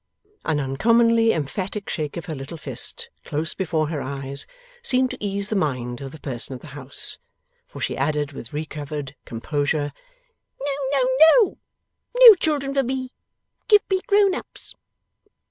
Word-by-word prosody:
An 155 -2 +1
uncommonly 230 - +3
emphatic 185 +7 -3
shake 155 -1 -3
of 170 - -5
her 165 - -4
little 140 +3 -7
fist 140 -5 -2
close 155 +2 -2
before 160 -5 -1
her 155 -3 -3
eyes, 140 0 -1 0.3
seemed 255 - +2
to - - -8
ease 200 0 -2
the 220 - -1
mind 125 -8 -1
of 135 -1 -6
the 155 - -11
person 130 -1 -4
of 125 - -10
the 155 - -11
house; 140 -1 -5 0.5
for - - -10
she - - -1
added 145 +1 0
with 120 -4 -9
recovered 150 -2 -5
composure, 145 +4 -1 0.7
'No, 280 0 -2 0.2
no, 260 -2 +3 0.3
no. 450 -7 +3 0.6
No - - +12
children 295 -7 -1
for 275 - +3
me. 260 0 -3 0.5
Give 420 -2 +6
me 380 -1 +2
grown 400 -1 +4
ups. - - -6
155 Hz, 155 wpm, -23 LUFS, -, 0.7 s, No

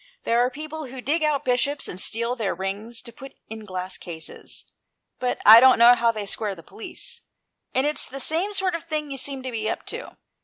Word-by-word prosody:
There 230 +1 +2
are 245 +1 +3
people 310 +2 -7
who 260 +1 -9
dig 300 +6 0
out 300 -2 +1
Bishops 275 +3 +1
and 180 - -5
steal 235 +5 +1
their 215 -7 -2
rings 205 +5 -4
to 235 - -10
put 270 +3 -12 0.2
in 220 -1 -7
glass 185 -1 -5
cases, 160 -2 -9 0.5
but 250 -1 -1
I 220 +2 +11
don't 260 +1 +7
know 235 +1 +8
how 235 -1 +3
they 215 -2 -5
square 200 0 -2
the 165 - -13
police; 445 +3 -8 0.5
and 260 - +2
it's 300 +1 -1
the 275 - -7
same 330 +9 0
sort 380 -2 0
of 335 0 -4
thing 305 -3 -3
you 270 - -4
seem 270 0 -2
to 260 - -4
be 220 -2 -2
up - - -4
to. - - -8
250 Hz, 220 wpm, -24 LUFS, 220-300 Hz, 0.5 s, I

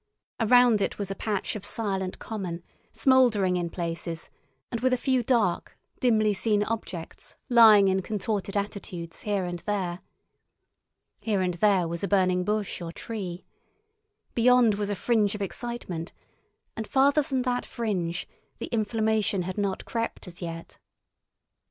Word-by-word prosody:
Around 240 -1 +5
it - - -1
was 200 -2 -3
a - - -3
patch 210 -1 -2
of 210 - -6
silent 195 -4 -2
common, 180 -6 -5 0.3
smouldering 235 -9 +4
in 175 -1 -1
places, 170 -1 -5 0.4
and 235 - -2
with 255 0 +2
a - - +3
few 260 0 +1
dark, 220 -7 0 0.2
dimly 215 -4 +3
seen 205 +1 +1
objects 205 -6 -6
lying 220 -5 +8
in 190 0 +2
contorted 205 0 -2
attitudes 190 -4 -5
here 200 -3 -1
and 175 0 -4
there. 185 -3 -2 1.2
Here 210 -4 0
and 180 -1 0
there 190 -1 +3
was 170 +2 -4
a - - +1
burning 185 -2 +2
bush 210 -2 -2
or 165 -1 -5
tree. 185 -3 -6 0.9
Beyond 245 -1 +5
was 205 0 -2
a 205 - -1
fringe 215 -1 +1
of 210 - -6
excitement, 195 -6 -5 0.6
and 220 -1 -5
farther 280 +3 +4
than 265 -3 -1
that 245 -1 0
fringe 185 -7 -3 0.3
the - - -6
inflammation 215 -3 +1
had 185 +1 -4
not 200 -2 -2
crept 230 -1 -3
as 175 0 -10
yet. 165 -1 -7
205 Hz, 145 wpm, -27 LUFS, 180-230 Hz, 1.2 s, lying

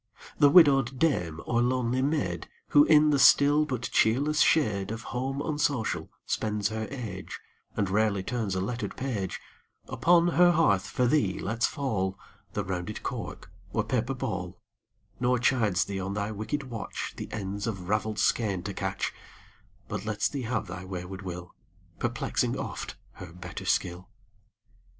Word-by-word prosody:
The 145 - +7
widowed 135 -5 +6
dame 90 - 0
or 120 -1 +1
lonely 125 0 +1
maid, 130 - -1 0.2
Who, 145 0 +7
in 150 -1 +6
the 140 - +3
still 145 +2 +6
but 130 -5 -3
cheerless 145 +7 +2
shade 105 -11 +3
Of 115 +1 -5
home 135 +3 -2
unsocial, 145 -6 -1 0.2
spends 105 -1 -1
her 110 0 -3
age, 115 -8 -6 0.4
And 100 - +1
rarely 100 0 +1
turns 110 -4 -2
a 95 - 0
lettered 120 +6 -4
page, 115 -8 -3 0.5
Upon 175 0 +4
her 175 +1 +5
hearth 100 - +3
for 125 - 0
thee 120 -8 +2
lets 115 +3 0
fall 100 -10 -2 0.4
The 105 - -1
rounded 95 +2 -4
cork - - -5 0.2
or - - +1
paper 125 +2 -1
ball, 100 -7 -4 0.6
Nor 125 0 +2
chides 115 -8 +2
thee 100 -1 -4
on 100 +1 -3
thy 105 +1 -2
wicked 110 +8 -3
watch, 115 -3 -5
The - - -7
ends 100 0 -4
of 95 -5 -4
raveled 105 +1 0
skein 100 -6 +1
to 100 +2 -4
catch, - - -2 0.7
But - - -4
lets 105 -1 0
thee 140 - -4
have 125 -3 -1
thy 90 -1 -7
wayward 95 +1 -6
will, 90 -2 -7 0.5
Perplexing - - -1
oft - - -5 0.2
her 90 -4 -10
better 90 +1 -8
skill. 90 +3 -1
110 Hz, 155 wpm, -28 LUFS, 95-135 Hz, 0.7 s, The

